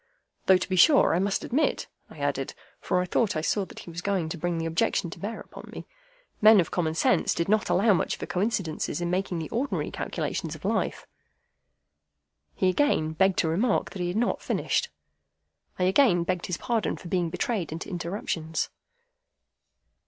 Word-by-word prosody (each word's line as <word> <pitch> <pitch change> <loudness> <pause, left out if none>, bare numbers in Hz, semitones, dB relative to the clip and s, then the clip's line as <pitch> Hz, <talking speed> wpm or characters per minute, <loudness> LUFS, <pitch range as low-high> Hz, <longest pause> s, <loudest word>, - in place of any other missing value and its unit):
Though 190 - +7
to 180 - -4
be 190 - -1
sure 280 - +6
I 170 - +2
must 195 +1 0
admit, 295 +6 0 0.2
I - - -14
added - - -2 0.2
(for 180 - 0
I - - -1
thought 205 +2 +1
I 155 - 0
saw 195 +5 0
that - - -15
he 170 - -9
was 170 +1 -6
going 185 -5 -1
to 170 - -4
bring 175 +1 -1
the 165 - -2
objection 165 +1 0
to - - -9
bear 220 +3 -4
upon - - -11
me), - - -8 0.6
men 215 -1 +8
of 170 - 0
common 160 -3 -1
sense 255 +9 +2
did 170 - -1
not 215 +1 +2
allow 205 +2 +4
much 180 - 0
for - - -5
coincidences 180 -6 -1
in 175 0 -2
making 185 -1 -1
the 160 -2 -4
ordinary 270 +5 -2
calculations - - -3
of - - -11
life. - - -1 1.5
He 190 - +1
again 185 - +2
begged 190 +3 +2
to - - +2
remark 195 +10 +1
that 190 - -6
he 175 - 0
had 175 +4 -2
not 240 - 0
finished. 480 - 0 0.9
I 180 - 0
again 185 -2 +4
begged 180 0 -2
his 180 - -2
pardon 230 -3 -1
for - - -10
being 175 -1 0
betrayed 180 0 -2
into 160 +2 -5
interruptions. 170 -3 -3
180 Hz, 190 wpm, -27 LUFS, 170-210 Hz, 1.5 s, men